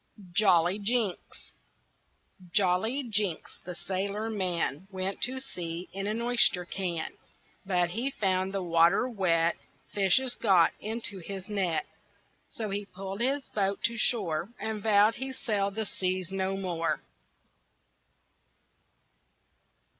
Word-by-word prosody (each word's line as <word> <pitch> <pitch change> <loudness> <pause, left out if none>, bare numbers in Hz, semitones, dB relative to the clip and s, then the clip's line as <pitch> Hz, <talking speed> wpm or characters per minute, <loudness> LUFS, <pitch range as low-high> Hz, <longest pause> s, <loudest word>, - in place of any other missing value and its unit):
JOLLY 180 -1 +4
JINKS 215 -2 -2 1.0
Jolly 205 +8 +2
Jinks, 210 -7 -1
the 180 0 -6
sailor 200 +5 -3
man, 180 -5 -1
Went 190 0 -4
to 260 +1 0
sea 175 -9 -6
in 195 +1 -3
an 215 +2 -1
oyster 235 -7 +4
can. 175 -3 -3 0.5
But 180 -2 +2
he 235 +8 -1
found 190 -6 0
the 195 -1 -2
water 170 +6 +4
wet, 170 -7 +1 0.4
Fishes 205 +6 +3
got 190 -6 +5
into 215 -2 -2
his 190 +1 -7
net, 195 -6 0 0.6
So 215 -3 -5
he 205 +1 -2
pulled 195 +2 -7
his 275 +3 +1
boat 200 -1 -1
to 230 - +2
shore 195 -7 0
And 220 -1 -3
vowed 210 +1 +5
he'd 265 +1 -4
sail 205 -6 0
the 220 +2 -3
seas 185 -2 -2
no 195 0 -1
more. 175 -4 -1
195 Hz, 120 wpm, -29 LUFS, 180-220 Hz, 1.0 s, got